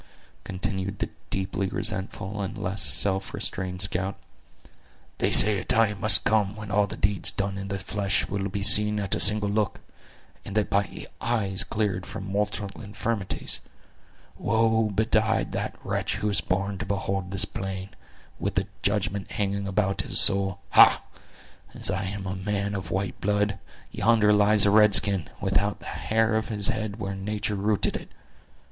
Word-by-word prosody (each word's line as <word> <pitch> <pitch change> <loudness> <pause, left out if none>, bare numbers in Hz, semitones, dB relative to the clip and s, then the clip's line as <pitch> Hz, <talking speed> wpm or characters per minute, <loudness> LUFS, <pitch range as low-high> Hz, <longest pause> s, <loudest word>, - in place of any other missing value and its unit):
continued 95 +1 -4
the - - -4 0.2
deeply 95 0 -2
resentful 100 0 -1
and 95 - -5
less 95 +3 -1
self 95 -1 +2
restrained 90 0 -1
scout; 95 0 -2 1.0
"they - - +1
say 105 -1 +8
a - - -6
time 105 -3 +1
must 105 +1 +6
come 105 -2 +1
when 105 -1 -8
all 105 0 +2
the - - -8
deeds 100 +1 +2
done 100 0 -2
in 95 0 -6
the 100 0 -4
flesh 100 +1 -2
will 100 0 -3
be 100 +1 -4
seen 105 +1 +5
at 100 -2 -1
a - - +1
single 105 0 +5
look; 105 0 -1 0.6
and 100 - -6
that 105 - 0
by 100 -2 -2 0.2
eyes 105 -5 +1
cleared 100 -3 -3
from 100 - -7
mortal 105 +1 -2
infirmities. 105 -1 -4 0.8
Woe 110 0 +1
betide 110 +1 0
the - - -3
wretch - - -2
who 105 - -2
is 100 -2 +1
born 100 +1 -2
to 100 - -4
behold 95 -1 -3
this 95 +1 +2
plain, 95 -1 -6 0.5
with - - -3
the - - 0 0.2
judgment 100 -1 -2
hanging 100 -1 -3
about 100 0 0
his - - +3
soul! 95 -1 +4
Ha—as - - +1
I 95 +1 -3
am 100 +1 -6
a 95 +1 -4
man 100 +1 -3
of 95 -2 -5
white 95 +1 -3
blood, 105 0 0 0.3
yonder 105 -1 +3
lies 105 0 +4
a 100 - +3
red 105 -1 +5
skin, 95 -7 +1
without 100 +1 0
the - - -15
hair 110 0 -1
of 110 0 -1
his 105 -3 -1
head 110 -1 -4
where 100 -1 -4
nature 105 +2 -3
rooted 105 +1 -1
it! - - -7
100 Hz, 165 wpm, -25 LUFS, 95-105 Hz, 1.0 s, say